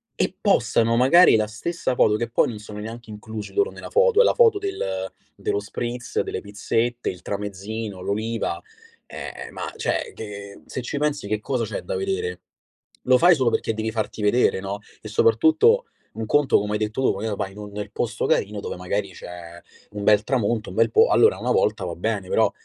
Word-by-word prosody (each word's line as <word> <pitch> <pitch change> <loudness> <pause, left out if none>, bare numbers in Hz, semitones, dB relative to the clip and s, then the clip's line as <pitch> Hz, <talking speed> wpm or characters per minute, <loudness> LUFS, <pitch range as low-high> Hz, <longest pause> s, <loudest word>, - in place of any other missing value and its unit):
e - - 0
postano 115 - +2
magari 135 +6 +6
la 110 -1 +2
stessa 130 +6 -3
foto, 105 -3 +3
che 115 +1 -2
poi 115 - +2
non 110 -3 -6
sono 105 0 -9
neanche 115 +2 -8
inclusi 105 0 -7
loro 410 +3 +1
nella - - -9
foto, 480 -1 +4
è - - +7
la - - +3
foto 455 -4 +5
del 95 - -3 0.2
dello 100 - -1
spritz, 120 +4 -3
delle - - -4
pizzette, 115 +4 -2
il 90 - -7
tramezzino, 105 0 -5
l'oliva, 110 +4 -2 0.5
ehm, - - -8
ma - - -5
cioè, - - -2
che 100 -2 -8
se 130 - -4
ci 135 +4 -4
pensi 145 -6 -1
che 105 0 -1
cosa 125 -3 -1
c'è 110 - -4
da - - -4
vedere? 405 +3 -2 0.7
Lo 130 0 +6
fai 175 0 +7
solo 130 -4 +2
perché 115 - 0
devi 110 0 -2
farti 110 -1 -3
vedere, 105 -1 +3
no? 100 +1 -4 0.2
E - - -8
soprattutto 455 +2 +4 0.3
un 110 0 -4
conto, 145 -1 +3
come 105 +1 -3
hai - - +1
detto 110 +4 -2
tu, - - +3
magari 105 +1 -3
va 100 - -2
in 100 - -15
un 105 0 -7
nel 105 0 -6
posto 120 +1 -2
carino 105 +1 0
dove - - -5
magari 100 +2 -2
c'è 85 0 -10 0.3
un 105 0 -6
bel 105 0 +5
tramonto, 115 -4 0
un - - -9
bel 115 - +3
po 450 +2 +5
allora 445 +2 +5
1 - - -1
volta - - +1
va - - -4
bene, - - -2
però 480 - +3
110 Hz, 200 wpm, -23 LUFS, 105-145 Hz, 0.7 s, è